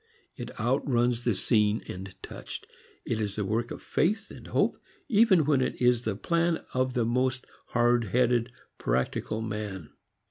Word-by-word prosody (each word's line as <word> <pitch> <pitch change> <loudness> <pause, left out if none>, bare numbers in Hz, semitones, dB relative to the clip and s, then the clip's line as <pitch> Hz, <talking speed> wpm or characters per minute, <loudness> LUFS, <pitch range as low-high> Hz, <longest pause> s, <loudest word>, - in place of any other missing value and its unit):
It - - -8
outruns 120 -2 +1
the 115 -4 +2
seen 105 +1 +2
and 95 +1 -7
touched. - - -7 0.4
It 110 -1 -1
is 100 -2 -2
the 105 - -1
work 115 +4 -1
of - - -8
faith 210 +7 0
and - - -11
hope - - +1 0.3
even 205 - +5
when 140 -3 +3
it - - -1
is 125 -1 +4
the 110 -4 -2
plan 170 - 0
of 130 0 0
the 120 -2 +2
most 130 +2 0 0.2
hard 120 -1 +3
headed 120 +2 +2 0.3
"practical" 65 - -1
man. 105 -7 -5
120 Hz, 155 wpm, -28 LUFS, 105-130 Hz, 0.4 s, even